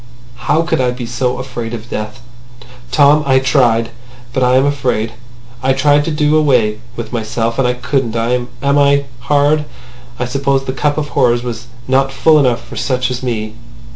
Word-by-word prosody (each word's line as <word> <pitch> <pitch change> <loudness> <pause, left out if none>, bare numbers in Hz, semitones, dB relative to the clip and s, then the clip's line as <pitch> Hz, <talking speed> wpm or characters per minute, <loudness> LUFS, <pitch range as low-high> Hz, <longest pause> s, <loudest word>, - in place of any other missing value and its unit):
"How 155 +3 +3
could 165 -5 0
I 125 - +2
be 125 0 -4
so 125 +1 -2
afraid 120 -3 -5
of 115 0 -10
death! 105 +3 -5 0.7
Tom, 145 +3 +5
I 130 -1 +4
tried. 120 -4 +2 0.4
But 130 - 0
I 125 0 +3
am 130 +1 +4
afraid. 125 -6 -1 0.5
I 135 +1 +2
tried 145 +2 +3
to 165 - -2
do 150 0 +2
away 120 -8 +2 0.2
with 120 +1 -7
myself. 115 +1 -2
And 130 - +3
I 125 - +1
couldn't. 125 -2 -2
Am 120 +2 0 0.2
I 140 0 +3
hard? 145 +3 +2 0.5
I 125 - -2
suppose 135 +1 0
the 130 - -3
cup 145 +3 0
of 150 -1 -2
horrors 120 -4 +2
was 115 -1 -6 0.2
not 135 +1 +2
full 155 +3 +4
enough 125 -4 +1
for - - -10
such 125 -1 -1
as 125 - -4
me. 110 -4 -3
130 Hz, 180 wpm, -15 LUFS, 120-140 Hz, 0.7 s, Tom